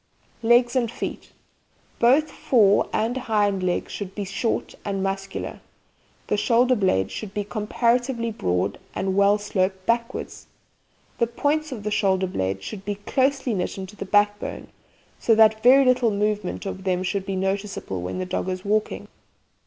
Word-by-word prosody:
LEGS 240 +2 +4
AND 240 -3 +1
FEET - - -6 0.7
Both 275 +6 +4
fore 205 -6 +3
and 225 +3 0
hind 210 -6 0
legs 180 -1 -1
should 195 -2 -6
be 205 - -3
short 195 +4 -2
and 195 -2 -2
muscular. 195 0 -4 0.7
The - - 0
shoulder 245 +4 +3
blades 140 - +1
should 205 -3 -7
be 205 - -1
comparatively 235 +3 0
broad, 90 - -1 0.2
and 190 -1 -1
well 200 +1 +4
sloped 190 -2 -1
backwards. 235 +2 -2 0.7
The 235 - +3
points 295 +6 -1
of 225 -5 -6
the 210 - -2
shoulder 190 -2 +2
blades 95 - -2
should 195 - -7
be 205 0 -3
closely 265 +4 0
knit 185 -1 -2
into 190 +1 -7
the 195 - -6
backbone, 205 +1 0 0.5
so 225 - +3
that 220 0 +5
very 265 +4 +7
little 250 -2 +3
movement 210 -2 -1
of 190 -1 -5
them 185 -1 0
should 195 +1 -2
be 195 - -2
noticeable 195 - -3
when 90 - -4
the 185 - -2
dog 185 - -2
is 185 +1 -4
walking. 215 +1 -1
205 Hz, 160 wpm, -24 LUFS, 190-235 Hz, 0.7 s, very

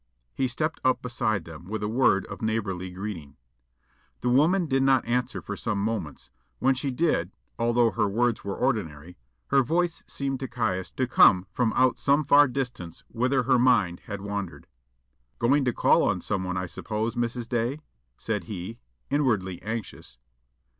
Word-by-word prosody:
He 130 - 0
stepped 155 +6 -2
up 130 0 +2
beside 115 -7 -1
them 80 0 -11
with 105 +2 -4
a - - 0
word 110 -4 +2
of - - -9
neighbourly 100 -5 -2
greeting. 90 -6 -7 0.8
The 125 - 0
woman 165 +9 +3
did 135 -3 +1
not 135 0 +3
answer 125 +1 -1
for 100 - -5
some 105 0 -2
moments; 100 -8 -4 0.3
when 135 +1 +3
she 130 +2 -2
did, 125 - 0 0.3
although 120 0 +3
her - - +1
words 115 +3 0
were 100 -1 -3
ordinary, 80 +2 -2 0.3
her 135 - +5
voice 170 +6 0
seemed 135 -1 -3
to 135 - -4
Caius 95 -8 -2
to 130 - 0
come 95 -7 +5
from 115 +1 +1
out 130 -1 +3
some 145 +2 +3
far 145 +1 +6
distance 125 -10 -5
whither 130 +2 +1
her 130 0 +3
mind 115 -9 +3
had 100 -2 -5
wandered. 100 -3 -5 0.7
"Going 135 +4 +2
to 125 - +2
call - - +3
on - - +1
someone, 95 -2 -2
I 90 - -2
suppose, 110 +5 -3
Mrs. 120 -1 -2
Day?" 120 +5 -1 0.4
said 105 -5 -3
he, 100 +4 -7 0.3
inwardly 110 -11 0
anxious. 110 - -6
115 Hz, 165 wpm, -26 LUFS, 100-130 Hz, 0.8 s, far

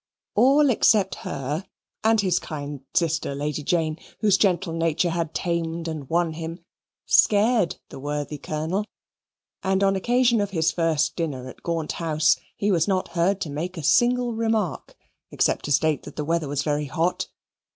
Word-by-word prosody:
All 275 +5 +5
except 210 -4 +3 0.2
her 145 +6 -3 0.4
and 220 0 +4
his 185 -3 +1
kind 145 -3 -6
sister 160 -4 0
Lady 150 +1 -2
Jane, 160 -1 0 0.2
whose 210 -3 +4
gentle 190 -3 +1
nature 165 +1 +1
had 165 -1 -2
tamed 170 -1 -2
and 155 -5 -5
won 170 -1 +1
him, 165 +1 -7 0.4
scared 210 -2 +4
the - - -9
worthy 145 +1 -4
Colonel, 160 +8 -2 0.8
and 190 0 +1
on 195 0 +3
occasion 240 +2 +2
of 205 - -1
his 165 -4 +1
first 160 -2 +1
dinner 140 -7 -3
at - - -11
Gaunt 165 -2 -2
House 155 -2 +2 0.2
he 205 0 0
was 170 -2 +2
not 190 -2 0
heard 180 +3 +1
to 155 - -3
make 170 +5 -4
a 160 - -5
single 240 - +3
remark 220 -6 -1 0.3
except - - 0
to 145 - -3
state 150 +1 +2
that 145 - -11
the 150 - -3
weather 165 -1 0
was 140 0 -1
very 150 -1 0
hot. 165 +5 -1
165 Hz, 165 wpm, -24 LUFS, 155-195 Hz, 0.8 s, All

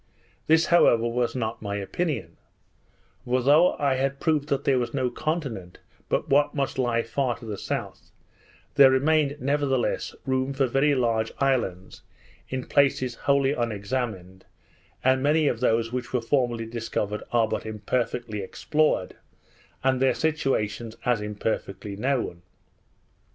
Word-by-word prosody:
This, 160 +1 +5
however, 120 -9 +5
was 120 +1 -1
not 115 -4 -3
my 100 -1 -3
opinion; 115 - -3 0.9
for 125 0 0
though 155 +7 +5
I 140 -3 +1
had 135 +1 -1
proved 155 -2 0
that 140 - 0
there 135 -2 +3
was 120 +3 -3
no 130 -3 0
continent 125 - -4 0.3
but - - 0
what 145 +1 +3
must 135 -2 -2
lie 120 -2 +1
far 125 0 -1
to 120 - -12
the 105 -2 -4
south, - - -5 0.6
there 135 -1 +8
remained 145 +2 +2
nevertheless 140 -2 0
room 130 +1 0
for 135 0 +2
very 135 +4 +2
large 115 -3 0
islands 120 -10 -1 0.5
in 130 -1 -3
places 135 -3 +2
wholly 140 +3 +1
unexamined; 105 -5 -3 0.6
and 130 0 +3
many 150 +2 +3
of 120 - 0
those 115 -2 +1
which 125 -1 -4
were 125 - +2
formerly 120 -2 0
discovered, 110 -2 -3
are 115 -2 +3
but - - -3
imperfectly 110 0 -2
explored, 150 +1 0 0.7
and 130 -1 +2
their 135 - +3
situations 120 -8 -1
as 120 -3 +2
imperfectly 105 -1 -4
known. 120 -6 -1
125 Hz, 140 wpm, -25 LUFS, 115-140 Hz, 0.9 s, there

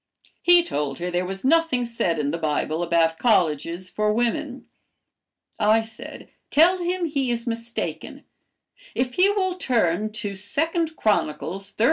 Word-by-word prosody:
He 350 0 +6
told 145 - -3
her 180 +1 -4
there 180 +1 -1
was 195 +4 -6
nothing 300 -4 +3
said 210 -8 -1
in 145 -1 -1
the 170 - -3
Bible 155 +1 -1
about 165 -1 +2
colleges 170 - +1
for 210 +3 0
women. 235 +1 -1 0.9
I 220 +2 +4
said, 225 0 -10 0.2
'Tell 345 +5 +5
him 355 0 -1
he 280 -5 -1
is 235 0 -2
mistaken. 230 0 -5 0.7
If 255 0 -1
he 370 +6 +4
will 385 -3 0
turn 215 - 0
to 205 -2 -4
2 320 - 0
'Chron. 215 -7 +2
xxxiv. 195 +6 -7
220 Hz, 145 wpm, -24 LUFS, 175-285 Hz, 0.9 s, He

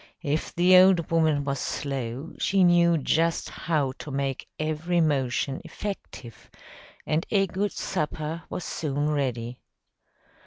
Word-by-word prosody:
If 150 +2 -2
the 180 +2 +6
old 185 -4 +4
woman 160 -3 +2
was 140 -1 -2
slow, 135 +2 -4
she 195 -1 +3
knew 170 -1 +5
just 165 +3 0
how 150 -5 -1
to - - -7
make 135 -1 -3
every 155 +3 -1
motion 135 -3 0
effective, 125 - -8 0.6
and 155 +2 0
a 195 -2 +3
good 195 +2 -2
supper 155 -1 -3
was 180 - -4
soon 145 -1 -2
ready. 125 -5 -2
155 Hz, 125 wpm, -26 LUFS, 140-170 Hz, 0.6 s, the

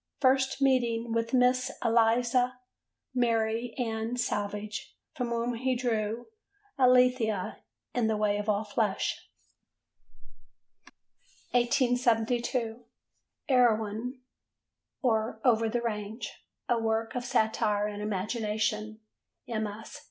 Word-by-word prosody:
First 265 0 +2
meeting 235 -3 +2
with 230 0 0
Miss 250 0 +3 0.2
Eliza 240 +2 +3 0.6
Mary 230 -1 0
Ann 225 -1 -2
Savage, 210 -3 -3 0.2
from 250 -2 -2
whom 235 +1 -1
he 255 +2 0
drew 230 -2 -1 0.5
Alethea 250 -6 +3 0.3
in 240 -3 +1
The 220 -1 +1
Way 210 -1 +1
of 210 +1 -3
All 210 0 +2
Flesh. 210 -1 -1 2.2
1872. 240 -1 +1 0.6
Erewhon 240 -1 +2 0.8
or 220 -2 +1
Over 225 -2 +4
the 240 +1 -1
Range: 215 0 -4 0.4
a 240 -1 +2
Work 225 0 -1
of 250 - -3
Satire 215 -3 +1
and 210 0 -4
Imagination: 215 +1 -2 0.5
MS. 220 +3 -4
230 Hz, 95 wpm, -29 LUFS, 215-245 Hz, 2.2 s, Over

